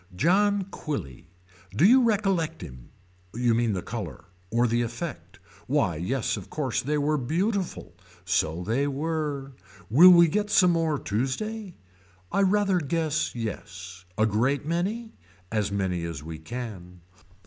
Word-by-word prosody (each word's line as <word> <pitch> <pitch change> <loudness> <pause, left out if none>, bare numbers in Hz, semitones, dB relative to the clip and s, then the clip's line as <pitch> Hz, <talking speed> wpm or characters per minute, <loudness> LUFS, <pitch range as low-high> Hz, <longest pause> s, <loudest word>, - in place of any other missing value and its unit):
John 200 - +3
Quilly. 80 - -6 0.5
Do 155 - +4
you 255 +6 +7
recollect 195 -8 0
him. 65 -2 -11 0.5
You 120 0 +2
mean 115 -1 +1
the 90 - -3
color. 90 -8 -6 0.2
Or 120 +3 +2
the 120 0 +1
effect. 120 +6 -5 0.3
Why 85 - +1
yes 110 - -1
of 95 - -9
course 140 -5 -1
they 150 +3 -1
were 150 +1 +1
beautiful. 185 - -2 0.3
So 90 -2 0
they 125 +8 0
were. 145 -1 -3 0.4
Will 165 +10 +9
we 170 -1 +8
get 205 +5 -1
some 185 -3 +5
more 165 -3 +1
Tuesday. 175 - -3 0.6
I - - +2
rather 195 -1 +3
guess 155 -2 -1
yes. 90 -4 -7
A 110 - +4
great 125 +7 +1
many. 195 +8 -2 0.4
As 105 -2 0
many 95 -4 -1
as 80 -4 -6
we 80 0 -7
can. 90 -4 -8
135 Hz, 140 wpm, -26 LUFS, 105-175 Hz, 0.6 s, Will